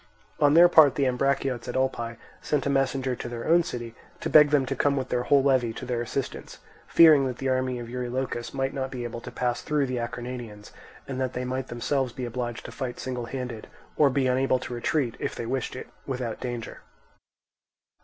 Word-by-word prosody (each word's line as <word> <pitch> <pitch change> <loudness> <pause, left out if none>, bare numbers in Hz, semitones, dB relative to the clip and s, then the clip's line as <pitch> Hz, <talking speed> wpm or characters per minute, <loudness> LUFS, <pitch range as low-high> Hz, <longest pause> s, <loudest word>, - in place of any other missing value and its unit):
On 145 0 +5
their 175 +1 +9
part, 155 -6 +6
the 140 - +1
Ambraciots 130 -1 0
at 125 - -4
Olpae 120 -3 -1 0.2
sent 145 -3 -1
a 140 - +1
messenger 135 -1 0
to 120 - -6
their 120 -1 -5
own 170 +2 +6
city, 120 -9 -6 0.3
to - - -3
beg 150 -1 +8
them 145 -2 +3
to - - -3
come 140 -1 +2
with 130 - -2
their 125 - 0
whole 140 +2 +3
levy 130 -4 +2
to 125 - -7
their 120 -1 -1
assistance, 125 +2 -4 0.3
fearing 155 -5 +7
that 125 -1 -4
the 135 - -2
army 130 -1 0
of 120 -1 -6
Eurylochus 125 0 -3
might 135 0 -2
not 135 -1 -3
be 125 -2 -5
able 115 0 -5
to - - -8
pass 120 -1 -2
through 150 -2 0
the 130 -2 -2
Acarnanians, 120 -3 -6 0.4
and 130 -1 -4
that 130 -1 -1
they 125 0 -3
might 130 0 -3
themselves 125 +1 -1
be 125 - -4
obliged 120 0 -4
to - - -7
fight 125 -3 -5
single 125 -2 -4
handed, 125 -4 -5 0.3
or 145 -2 +5
be 135 0 +1
unable 130 +1 +2
to 125 - -7
retreat, 120 +1 0
if - - -3
they 120 - -4
wished 130 +1 -2
it, - - -7 0.2
without 125 -4 -3
danger. 120 -2 -5
130 Hz, 210 wpm, -26 LUFS, 120-135 Hz, 0.4 s, their